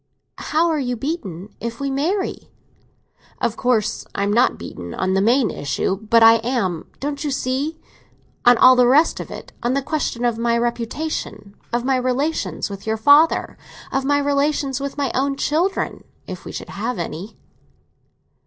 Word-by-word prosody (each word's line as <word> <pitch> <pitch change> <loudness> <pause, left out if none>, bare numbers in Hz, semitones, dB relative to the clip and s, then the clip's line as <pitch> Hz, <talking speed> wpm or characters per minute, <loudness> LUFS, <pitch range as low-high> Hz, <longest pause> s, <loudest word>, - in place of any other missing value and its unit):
"How 320 +3 +1
are 320 -2 0
you 250 -2 -1
beaten 215 - -5
if 230 +1 -5
we 280 -1 -2
marry?" 345 +9 -2 0.9
"Of 230 - 0
course, 230 -4 0
I 200 - 0
am 205 +1 +1
not 240 +3 +3
beaten 85 -1 -8
on 185 0 0
the 190 - +2
main 235 +3 +3
issue; 145 +6 -1
but 220 +2 +3
I 225 0 +8
am, 225 -8 -2
don't 285 +1 -3
you 295 - -1
see, 275 +4 -2 0.6
on 245 0 +6
all 255 +2 +8
the 250 -1 +5
rest 295 +6 +4
of - - -6
it—on 245 +2 -4
the 275 - +1
question 275 -5 -2
of 235 -2 0
my 235 0 +2
reputation, 235 -2 -3 0.2
of 240 +1 -1
my 265 -1 +2
relations 255 +5 -1
with 200 +1 -9
your 220 0 0
father, 285 +8 +4 0.3
of 270 - 0
my 285 +1 +2
relations 285 -1 0
with 280 0 -4
my 280 -3 0
own 275 +1 0
children, 330 +8 -1 0.2
if - - -8
we - - -6
should - - -7
have 230 +3 -3
any." 170 +4 -6
250 Hz, 170 wpm, -21 LUFS, 225-285 Hz, 0.9 s, I